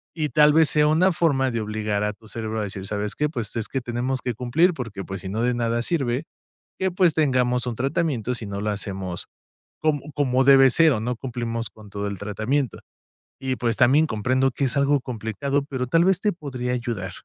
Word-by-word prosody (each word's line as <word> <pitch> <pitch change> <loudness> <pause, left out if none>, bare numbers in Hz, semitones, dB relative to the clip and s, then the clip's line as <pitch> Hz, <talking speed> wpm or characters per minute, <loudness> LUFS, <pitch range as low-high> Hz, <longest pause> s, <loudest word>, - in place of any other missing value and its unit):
Y 155 -3 -1
tal 150 0 +5
vez 160 -1 +5
sea 150 -1 +3
una 170 +5 +4
forma 140 -6 +2
de 115 -1 -2
obligar 105 -1 -2
a 105 0 -1
tu 110 +1 -19
cerebro 110 0 -4
a - - -1
decir: 95 -1 -6
"¿Sabes 105 0 -3
qué? 150 - +1
Pues, 115 -7 -5
es 115 -2 -2
que 135 - -2
tenemos 120 +2 -2
que 125 - -2
cumplir 150 - +2
porque, 115 -8 -6
pues, 95 0 -6
si 95 - -6
no, 110 +4 -2
de 125 0 +2
nada 120 0 0
sirve 135 -3 -1 0.5
que, 190 0 +1
pues, 180 -1 +3
tengamos 125 -5 +1
un 120 -2 -3
tratamiento 135 - -1
si 115 -3 -6
no 100 0 -4
lo 105 - 0
hacemos 95 -3 -5 0.5
com 155 -2 +2 0.2
como 130 -3 +2
debe 135 -1 +7
ser 160 +2 +5
o 110 - -1
no 125 +2 -2
cumplimos 115 -2 -4
con 110 -2 -15
todo 100 +1 -4
el 100 -1 -4
tratamiento. 110 +5 -1 0.6
Y, 130 -1 -2
pues, 115 -2 0
también 140 +6 +5
comprendo 130 +3 +1
que 135 - -3
es 130 +1 -1
algo 140 0 +3
complicado, 130 +4 -2
pero 130 -2 -2
tal 165 +6 +3
vez 190 -1 +2
te 210 - +2
podría 130 -7 -4
ayudar. 120 -7 -3
125 Hz, 215 wpm, -24 LUFS, 110-145 Hz, 0.6 s, debe